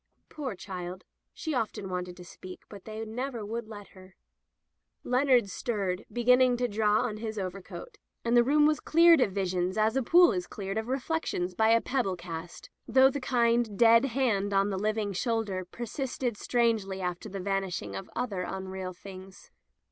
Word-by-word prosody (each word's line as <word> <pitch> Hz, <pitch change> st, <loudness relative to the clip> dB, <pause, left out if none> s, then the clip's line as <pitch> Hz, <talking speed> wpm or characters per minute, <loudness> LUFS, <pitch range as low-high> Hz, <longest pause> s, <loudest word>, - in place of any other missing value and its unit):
Poor 270 Hz, -8 st, -5 dB
child, 185 Hz, -1 st, -7 dB, 0.3 s
she 315 Hz, -, -4 dB
often 220 Hz, -5 st, -2 dB
wanted 180 Hz, -1 st, -4 dB
to 180 Hz, -, -11 dB
speak, 185 Hz, +1 st, -11 dB
but 200 Hz, -3 st, -11 dB
they 215 Hz, -1 st, -7 dB
would 220 Hz, 0 st, -5 dB
never 240 Hz, +1 st, -4 dB
let 215 Hz, -2 st, -6 dB
her. 185 Hz, 0 st, -16 dB, 0.9 s
Leonard 250 Hz, -3 st, +3 dB
stirred, 195 Hz, -2 st, -3 dB
beginning 250 Hz, +1 st, +4 dB
to 245 Hz, 0 st, 0 dB
draw 210 Hz, -1 st, +2 dB
on 225 Hz, -4 st, -2 dB
his 220 Hz, 0 st, -5 dB
overcoat, 195 Hz, -, -7 dB, 0.3 s
and 235 Hz, +1 st, +2 dB
the 240 Hz, -, +7 dB
room 295 Hz, +4 st, +4 dB
was 305 Hz, 0 st, +3 dB
cleared 335 Hz, -2 st, +5 dB
of 200 Hz, -, +2 dB
visions 185 Hz, 0 st, -1 dB
as 220 Hz, +2 st, +2 dB
a 265 Hz, -, +2 dB
pool 345 Hz, +6 st, +6 dB
is 180 Hz, -3 st, -3 dB
cleared 195 Hz, +1 st, -4 dB
of 220 Hz, -, -5 dB
reflections 260 Hz, -, -2 dB
by 220 Hz, +4 st, +2 dB
a 230 Hz, 0 st, +6 dB
pebble 245 Hz, -8 st, -1 dB
cast, 170 Hz, -1 st, -8 dB, 0.2 s
though 265 Hz, +3 st, +5 dB
the 285 Hz, -, -4 dB
kind, 235 Hz, -4 st, +1 dB
dead 230 Hz, +2 st, +6 dB
hand 225 Hz, -6 st, 0 dB
on 195 Hz, +1 st, +2 dB
the 190 Hz, -, -2 dB
living 210 Hz, 0 st, -1 dB
shoulder 205 Hz, -3 st, -1 dB
persisted 240 Hz, +3 st, -4 dB
strangely 220 Hz, -4 st, 0 dB
after 180 Hz, +3 st, -4 dB
the 195 Hz, 0 st, -6 dB
vanishing 190 Hz, -, -2 dB
of 95 Hz, -, -7 dB
other 225 Hz, -6 st, -2 dB
unreal 190 Hz, 0 st, -5 dB
things. 190 Hz, +1 st, -12 dB
215 Hz, 170 wpm, -29 LUFS, 190-245 Hz, 0.9 s, the